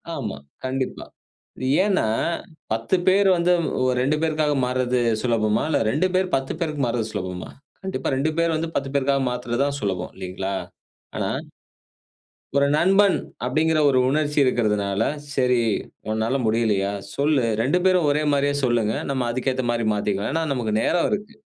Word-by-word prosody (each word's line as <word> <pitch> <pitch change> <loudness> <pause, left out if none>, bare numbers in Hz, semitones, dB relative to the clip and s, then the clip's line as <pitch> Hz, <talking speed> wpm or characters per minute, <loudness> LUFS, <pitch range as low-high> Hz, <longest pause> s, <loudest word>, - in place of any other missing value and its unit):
ஆமா. 110 - -4 0.3
கண்டிப்பா. 130 0 -3 0.8
ஏன்னா 195 - +2 0.7
10 115 +11 +1
பேர் 195 +1 +5
வந்து 175 +1 +3 0.5
2 150 +4 +1
பேருக்காக 155 -2 +1
மாற்றது 125 0 0 0.2
சுலபமா? 110 -3 +1
இல்ல 150 - +2
2 170 +7 +2
பேர் 185 0 +2
10 135 0 -2
பேருக்கு 155 -4 -2
மாற்றது 115 -2 -1
சுலபமா? 90 -1 -5 0.3
கண்டிப்பா 160 -9 -3
2 150 +4 0
பேர் 170 -1 +2
வந்து 165 +1 -1
10 135 -1 -1
பேருக்காக 140 0 +2
மாத்துறது 125 +1 -2
தான் 140 0 -2
சுலபம். 95 -3 -2
இல்லைங்களா? 95 +1 -4 0.6
ஆனா - - -1 1.3
ஒரு 140 - +4
நண்பன். 195 +3 +4 0.3
அப்படிங்கிற 155 +4 +2
ஒரு 130 -1 +3
உணர்ச்சி 150 +1 0
இருக்கிறதுனால, 105 -5 +1 0.3
சரி 125 -2 +3 0.5
உன்னால 110 +5 0
முடியலையா? 110 -3 +1 0.2
சொல்லு 140 -2 +2 0.2
2 145 +9 +2
பேரும் 180 -5 +4
ஒரே 150 +1 +1
மாதிரியே 140 0 +1
சொல்லுங்க. 115 -3 +1 0.2
நம்ம 130 -3 -1
அதுக்கு 130 +2 -1
ஏத்த 130 -1 -2
மாதிரி 115 -1 -1
மாத்திக்கலாம். 105 +2 -1
ஏன்னா 165 0 0
நமக்கு 115 -4 -2
நேரம் 175 - +2
இருக்கு. 210 +2 -3
130 Hz, 145 wpm, -23 LUFS, 115-155 Hz, 1.3 s, பேர்